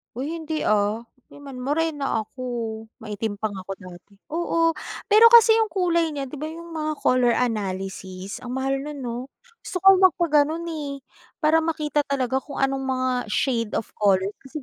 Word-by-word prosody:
Uy 275 Hz, +5 st, -3 dB
hindi, 320 Hz, -2 st, -3 dB
ah, 210 Hz, +2 st, +1 dB, 0.6 s
morena 290 Hz, -3 st, -1 dB
ako, 255 Hz, +4 st, -11 dB, 0.6 s
maitim 210 Hz, -1 st, -3 dB
pa 210 Hz, +1 st, -3 dB
nga 190 Hz, -2 st, -8 dB
ako 195 Hz, -, -4 dB
dati, 180 Hz, +2 st, -13 dB, 0.2 s
oo, 330 Hz, 0 st, +1 dB, 0.4 s
pero 435 Hz, +2 st, +8 dB
kasi 460 Hz, -1 st, +8 dB
yung 445 Hz, -, +3 dB
kulay 345 Hz, -4 st, +1 dB
niya 275 Hz, -2 st, -4 dB
di 295 Hz, -, -7 dB
ba 305 Hz, -, -4 dB
yung 335 Hz, +2 st, -8 dB
mga 310 Hz, -1 st, -2 dB
color 245 Hz, -2 st, +3 dB
analysis 195 Hz, -4 st, -3 dB
ang 250 Hz, 0 st, -6 dB
mahal 270 Hz, +1 st, 0 dB
nun 285 Hz, -1 st, -6 dB
no? 235 Hz, -1 st, -3 dB, 0.4 s
Gusto 365 Hz, -1 st, -6 dB
ko 385 Hz, -1 st, +8 dB
magpa-ganun, 325 Hz, -3 st, +3 dB
eh, 285 Hz, -4 st, -5 dB, 0.4 s
para 315 Hz, +1 st, +5 dB
makita 305 Hz, -2 st, 0 dB
talaga 265 Hz, -2 st, 0 dB
kung 275 Hz, 0 st, -6 dB
anong 270 Hz, 0 st, 0 dB
mga 255 Hz, 0 st, 0 dB, 0.2 s
shade 230 Hz, 0 st, 0 dB
of 225 Hz, -, -2 dB
colors. 195 Hz, -1 st, +3 dB
Kasi 275 Hz, +2 st, -8 dB
275 Hz, 165 wpm, -24 LUFS, 225-320 Hz, 0.6 s, pero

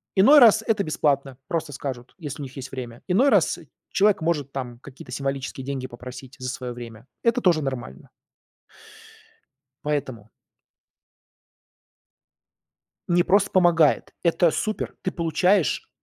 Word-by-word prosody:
Иной 265 Hz, +10 st, +8 dB
раз 225 Hz, -3 st, +7 dB
это 215 Hz, -3 st, +1 dB
бесплатно, 140 Hz, -4 st, 0 dB
просто 160 Hz, -3 st, -3 dB
скажут, 130 Hz, -2 st, -6 dB
если 150 Hz, -5 st, -7 dB
у -, -, -4 dB
них 130 Hz, -1 st, -9 dB
есть 130 Hz, 0 st, -7 dB
время. 120 Hz, -3 st, -7 dB
Иной 230 Hz, +10 st, +4 dB
раз -, -, +3 dB, 0.3 s
человек 205 Hz, -1 st, +3 dB
может, 155 Hz, -4 st, -1 dB
там, 125 Hz, -3 st, -6 dB
какие-то 135 Hz, +1 st, -12 dB
символические 135 Hz, -1 st, -4 dB
деньги 135 Hz, -2 st, -4 dB
попросить, 125 Hz, +2 st, -10 dB
за 130 Hz, 0 st, -4 dB
свое 125 Hz, -1 st, -5 dB
время. 115 Hz, -1 st, -10 dB, 0.2 s
Это 235 Hz, +1 st, +2 dB
тоже 170 Hz, -6 st, +3 dB
нормально. 130 Hz, -, -6 dB, 1.8 s
Поэтому 130 Hz, -7 st, -3 dB, 2.8 s
Не 175 Hz, 0 st, +4 dB
просто 200 Hz, +3 st, +3 dB
помогает. 170 Hz, -5 st, +3 dB
Это 170 Hz, 0 st, +3 dB
супер! 215 Hz, +6 st, -3 dB
Ты 185 Hz, -, -1 dB
получаешь 170 Hz, 0 st, +1 dB
145 Hz, 125 wpm, -24 LUFS, 130-180 Hz, 2.8 s, Иной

